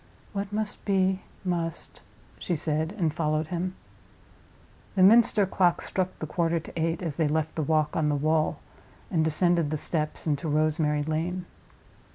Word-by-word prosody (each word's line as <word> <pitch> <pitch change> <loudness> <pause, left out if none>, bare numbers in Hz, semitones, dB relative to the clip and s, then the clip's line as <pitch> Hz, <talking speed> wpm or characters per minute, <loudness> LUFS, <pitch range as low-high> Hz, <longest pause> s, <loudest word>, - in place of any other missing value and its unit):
"What 200 0 -3
must 210 0 -3
be, 190 -1 +1 0.2
must," 170 -3 -3 0.4
she 175 - -1
said, 155 +1 -1
and 165 -6 +1
followed 155 -1 0
him. 180 +1 -2 1.2
The 185 - +4
Minster 215 0 +6
clock 180 -2 +2
struck 185 -1 -2
the - - -4
quarter 165 +1 0
to 160 - -11
eight 165 +1 -1
as 155 -4 -3
they 160 -3 +2
left 155 +1 0
the 160 - -2
Walk 155 0 +1
on 155 -2 +2
the 145 - +1
Wall 155 +2 +1 0.5
and 165 -4 +2
descended 170 0 +2
the 155 - -1
steps 155 0 -2
into 150 0 -1
Rosemary 150 0 +1
Lane. 170 +4 -2
165 Hz, 160 wpm, -27 LUFS, 155-180 Hz, 1.2 s, Minster